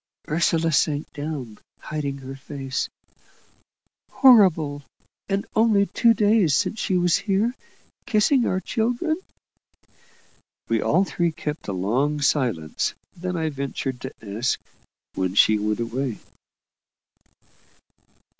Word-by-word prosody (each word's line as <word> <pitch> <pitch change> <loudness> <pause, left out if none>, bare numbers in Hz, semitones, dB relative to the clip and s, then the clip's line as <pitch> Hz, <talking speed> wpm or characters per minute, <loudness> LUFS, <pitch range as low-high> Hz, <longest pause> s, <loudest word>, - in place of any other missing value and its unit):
Ursula 165 +1 +1
sank 150 +1 0
down, 145 -7 -6 0.2
hiding 145 -2 -4
her 135 0 -8
face. 135 -1 -4 1.2
"Horrible! 185 - +5 0.5
And 195 0 0
only 215 -3 +4
two 230 +2 +3
days 205 - +3
since 220 - -1
she 185 -3 +1
was 175 -1 +3
here, 210 +4 0 0.5
kissing 240 +2 +3
our 185 - 0
children." 245 - -1 1.5
We - - +1
all 185 - +3
three 175 -3 -1
kept 150 0 -5
a 100 - -2
long 125 +11 0
silence; 120 - 0 0.2
then 180 0 -4
I 160 -1 0
ventured 135 -2 -4
to 130 - -5 0.3
ask 120 - +1 0.5
when 95 0 -2
she 105 +1 +5
went 105 +1 -1
away? 120 0 -2
155 Hz, 110 wpm, -23 LUFS, 135-200 Hz, 1.5 s, Horrible